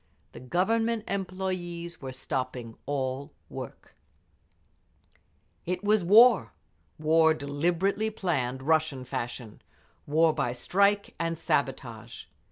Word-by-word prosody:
The - - -10
Government 225 - 0
employees 185 -3 -4
were 135 - -5
all - - -7
stopping 125 -3 -4 0.7
work…. - - -9 1.7
It 180 +2 -2
was 210 -1 +3
war—war 165 -6 +4
deliberately 175 +9 0
planned, 135 - -2
Russian 155 -3 +1
fashion; 120 -3 -6 0.5
war 160 +2 +4
by 125 -4 -1
strike 200 +10 +1
and 165 0 -1
sabotage. 120 -6 -2
165 Hz, 90 wpm, -28 LUFS, 130-190 Hz, 1.7 s, war—war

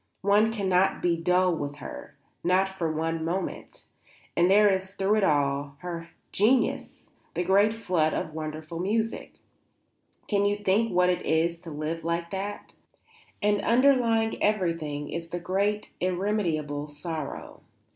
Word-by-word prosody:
One 205 +3 +4
cannot 190 -3 +1
be 175 -1 +3
dull 180 +2 +2
with 145 -2 -4
her, 145 - -9 0.3
not 185 +2 +3
for 175 -4 -2
one 160 +1 -2
moment. 175 +4 -4 0.5
And 175 +1 +4
there 205 +2 +6
is 190 -1 0
through 200 +2 +2
it 210 - +2
all 140 -3 +1
her 170 -2 -6 0.2
genius, 235 +5 +1 0.3
the 175 - 0
great 200 +4 +4
flood 180 -8 0
of 155 - -3
wonderful 155 +1 -6
music; 220 +5 -1 0.9
can 200 -2 +1
you 205 0 +2
think 205 +3 +1
what 180 0 +3
it 180 - -2
is 165 +2 +1
like 165 - -28
to - - -6
live 155 +2 -4
with 170 +1 -2
that? 200 +1 -5 0.7
And 205 0 +2
under 260 +4 +5
lying 225 -3 0
everything 165 -8 -1
is 165 +1 -5
the 175 - -3
great 200 +4 -1
irremediable 175 -6 -1
sorrow. 150 0 -6
180 Hz, 145 wpm, -27 LUFS, 160-205 Hz, 0.9 s, there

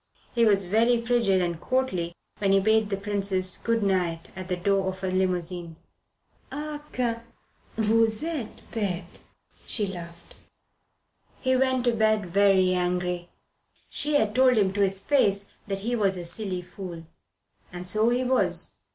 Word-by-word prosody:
He 235 -1 +3
was 200 -3 +3
very 230 +5 +3
frigid 230 -6 +2
and 170 -1 -3
courtly 185 -10 -1 0.2
when 195 -1 +2
he 195 - +5
bade 220 +1 +2
the 195 - -1
Princess 195 -2 -1
good 230 -1 0
night 180 -4 0
at 185 0 -7
the 185 - -1
door 195 +1 +1
of 190 0 -3
her 190 -1 -1
limousine. 180 -2 -1 0.8
"Ah, 295 +1 -5
que 235 -2 -1 0.6
vous 220 +2 +3
etes 310 -9 -4
bete!" 200 -5 -3 0.5
she 210 - +2
laughed. 170 -3 -9 1.0
He 260 -1 +1
went 260 -1 +2
to 240 - +4
bed 215 -2 +2
very 190 0 +3
angry. 180 -1 -1 0.6
She 295 0 +1
had 220 -7 +2
told 255 0 +4
him 195 -3 +2
to 205 - 0
his 195 -1 +2
face 200 -5 +2 0.2
that 195 -1 -2
he 240 +1 0
was 195 -4 +1
a 175 - -5
silly 180 0 -2
fool. 175 -2 -8 0.7
And 180 0 -7
so 215 +5 +2
he 245 +1 +1
was. 255 +1 0
200 Hz, 155 wpm, -26 LUFS, 185-230 Hz, 1.0 s, he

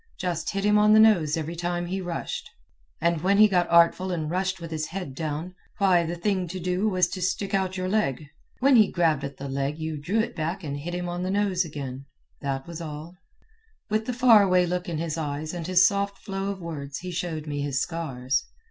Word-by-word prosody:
Just 175 -3 -2
hit 195 -1 -2
him 210 0 +4
on 210 0 +5
the 215 - +7
nose 175 -9 +5
every 160 +1 -4
time 175 +1 -2
he 190 +2 -3
rushed, 175 -2 -4 0.5
and 170 -1 +1
when 195 +3 +3
he 215 +1 +8
got 180 -3 +1
artful 170 +2 +4
and 160 -3 -2
rushed 185 +1 -1
with 165 -1 -8
his 155 -1 -2
head 180 -6 -6
down, 160 +4 -4 0.2
why, 185 -4 +4
the 170 - -3
thing 185 0 -1
to 185 +3 -5
do 180 +4 0
was 185 -3 +2
to 185 +1 -5
stick 195 +2 -1
out 190 -1 0
your 185 0 -2
leg. 170 - 0 0.4
When 270 -1 +6
he 215 -3 +5
grabbed 160 -5 +2
at 140 - -6
the 140 - -6
leg 140 +2 -2
you 160 -1 -4
drew 180 +9 -1
it 235 +2 -1
back 170 +4 -3
and 140 -2 -4
hit 175 +4 -5
hint 180 0 -3
on 175 0 -3
the 185 - -2
nose 195 -2 +1
again. 140 -4 -6 0.3
That 135 -1 -3
was 170 -1 -7
all. 155 +1 -7 0.8
With 215 +1 0
the 250 - -1
far 240 -3 +6
away 185 -2 +4
look 180 0 -2
in 165 - -2
his 165 0 -3
eyes 150 +1 -3
and 170 -2 -5
his 185 0 +5
soft 200 0 -1
flow 195 -1 -4
of 200 -1 -4
words 145 -5 -6
he 180 0 -6
showed 165 -3 -3
me 145 -1 -3
his 140 -2 -1
scars. 135 -6 -2
175 Hz, 230 wpm, -26 LUFS, 155-190 Hz, 0.8 s, he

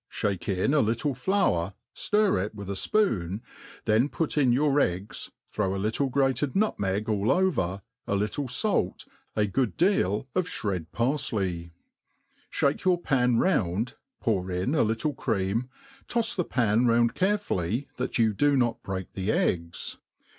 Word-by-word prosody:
aos - - -7
melt, 95 - -4
fliake 95 - -2
in 135 +10 +2
a 155 - +4
little 115 +4 +1
fiour^ 125 - +1 0.2
ftir 210 - +2
it 105 +2 -6
with 100 -1 -6
a - - -1
fpOon* 100 - 0 0.5
then 115 +5 +3
put 160 0 -2
itk 135 -5 +3
your 145 +3 +3
eggs,. 95 -4 -2 0.2
throw.aJictle.gra^ 110 +7 +1 0.2
nutsaeg 105 - 0
all 105 -1 0
over^ 125 - +1 0.3
a 100 - +1
little 105 +8 -1
fait, 200 - 0 0.3
m 105 - +4
good 125 -6 0
deal.of 165 - +1
flired 95 -6 -3
paritej; 105 - -1 0.8
ihake 140 +1 +1
your 185 -1 +4
pan 125 -7 +2
round, 115 - +1 0.3
pour 95 -6 0
in 90 +9 -1
a 160 - +3
Uttle 115 +6 -1
cream, 110 +2 -1 0.4
toTs 235 -2 0
the^pan 125 - +2
round 115 0 +3
carefully, 145 - 0
that 125 +1 -2
you 110 -2 +3
dd 145 +6 +3
not 120 -2 +1
break 95 -1 -5
the 95 +2 -1
eggs. 85 -4 -1
115 Hz, 145 wpm, -27 LUFS, 95-145 Hz, 0.8 s, a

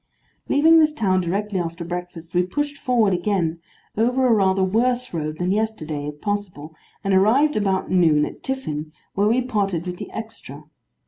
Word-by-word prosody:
Leaving 320 +3 +6
this 305 -1 +3
town 190 -7 +1
directly 195 +3 -2
after 170 0 -4
breakfast, 175 -1 -7
we 180 - +3
pushed 285 +10 -3
forward 230 -6 +2
again, 175 -3 0 0.4
over 250 +4 +2
a 245 - +5
rather 190 -2 +3
worse 245 +5 0
road 155 -2 -3
than 180 +2 -1
yesterday, 170 -9 -2
if 150 0 -7
possible, 185 -7 -4 0.3
and 195 -1 +1
arrived 240 +11 +4
about 195 -3 0
noon 160 -5 +4
at - - -9
Tiffin, 155 - -4 0.2
where 200 +1 +2
we 245 +4 +2
parted 200 -8 -1
with 180 -1 -5
the - - -7
extra. 215 - -8
195 Hz, 170 wpm, -22 LUFS, 170-230 Hz, 0.4 s, Leaving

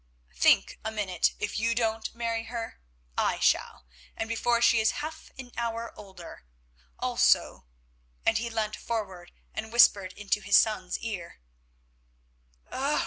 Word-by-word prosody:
"Think - - +3
a 220 - -2
minute. 200 -5 0
If 205 - -3
you 230 +1 +1
don't 225 -1 -1
marry 230 -1 -2
her 230 0 -6 0.4
I - - +1
shall, - - +1 0.3
and 225 - -2
before 235 +1 +1
she 235 -1 +5
is 220 0 +3
half 315 0 -8
an 255 -2 -9
hour 230 0 -3
older; 190 - -12 0.5
also—" 60 - +2 0.6
and 225 - +3
he 235 +1 -3
leant 220 -2 -2
forward 190 -6 -5 0.2
and 220 0 -5
whispered 200 -5 +5
into 205 +1 -1
his 200 - +5
son's 190 -5 +1
ear. 200 - -6
220 Hz, 135 wpm, -28 LUFS, 200-230 Hz, 0.6 s, she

